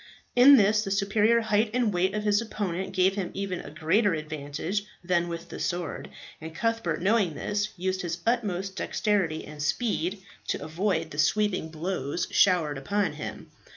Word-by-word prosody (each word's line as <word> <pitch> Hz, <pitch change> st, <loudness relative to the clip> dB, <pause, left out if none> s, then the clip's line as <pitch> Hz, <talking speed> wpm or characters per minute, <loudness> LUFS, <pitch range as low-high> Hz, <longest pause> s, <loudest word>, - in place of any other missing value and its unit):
In 265 Hz, +3 st, +9 dB
this 210 Hz, 0 st, +4 dB
the 195 Hz, -, -4 dB
superior 210 Hz, +4 st, +3 dB
height 215 Hz, 0 st, +2 dB
and 235 Hz, -5 st, +2 dB
weight 185 Hz, +3 st, +1 dB
of 210 Hz, -, -2 dB
his 205 Hz, 0 st, +3 dB
opponent 190 Hz, -5 st, -3 dB
gave 190 Hz, 0 st, +3 dB
him 195 Hz, -3 st, -3 dB
even 195 Hz, -2 st, -3 dB
a -, -, -8 dB
greater 165 Hz, +6 st, +2 dB
advantage 155 Hz, +5 st, -4 dB, 0.2 s
than 175 Hz, -1 st, +1 dB
with 170 Hz, -1 st, -6 dB
the -, -, -7 dB
sword, 175 Hz, -2 st, -3 dB, 0.3 s
and 160 Hz, 0 st, -8 dB
Cuthbert 230 Hz, -5 st, -1 dB
knowing 200 Hz, -5 st, +2 dB
this, 210 Hz, +4 st, -1 dB
used 185 Hz, +1 st, -1 dB
his 170 Hz, -1 st, -3 dB
utmost 200 Hz, -5 st, -1 dB
dexterity 190 Hz, -7 st, 0 dB
and 150 Hz, 0 st, -9 dB
speed 190 Hz, +2 st, -1 dB, 0.2 s
to -, -, -2 dB
avoid 165 Hz, 0 st, -1 dB
the 145 Hz, -, -6 dB
sweeping 185 Hz, +1 st, +1 dB
blows 160 Hz, -1 st, -3 dB
showered 160 Hz, -7 st, +3 dB
upon 200 Hz, +9 st, 0 dB
him. -, -, -7 dB
190 Hz, 165 wpm, -27 LUFS, 165-210 Hz, 0.3 s, In